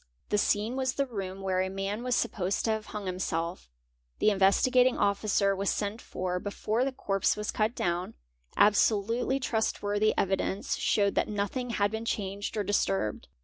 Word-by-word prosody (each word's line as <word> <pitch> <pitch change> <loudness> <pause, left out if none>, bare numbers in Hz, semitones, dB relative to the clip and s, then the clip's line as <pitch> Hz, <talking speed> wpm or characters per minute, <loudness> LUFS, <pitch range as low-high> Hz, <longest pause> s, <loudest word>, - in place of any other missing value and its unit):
The 210 - +2
scene 210 +4 +1
was 260 -1 0
the 275 - 0
room 195 -6 -5
where 190 -1 0
a 190 - -1
man 195 +3 -3
was 250 0 0
supposed 190 -5 -1
to 225 - +2
have 220 -1 -3
hung 210 -2 -6
himself; 180 - -3 0.5
the - - +4
Investi 195 +5 +3
gating 255 0 +4
Officer 200 -1 +2
was 195 0 -1
sent 210 +2 -2
for 180 0 -3
before 210 +4 -1
the 270 - 0
corpse 195 -7 0
was 210 0 -2
cut 215 +2 0
down; 175 +1 -2 0.4
absolutely 215 +5 +3
_ - - -15
trustworthy 215 -2 0
evidence 195 +1 0
showed 200 -2 +2
that - - +1
nothing 210 +5 -2
had 205 -3 +1
been 220 +1 -4
changed 200 -1 -3
or 210 - +1
dis 205 +1 +2
turbed. 95 +2 -2
205 Hz, 180 wpm, -29 LUFS, 195-220 Hz, 0.5 s, the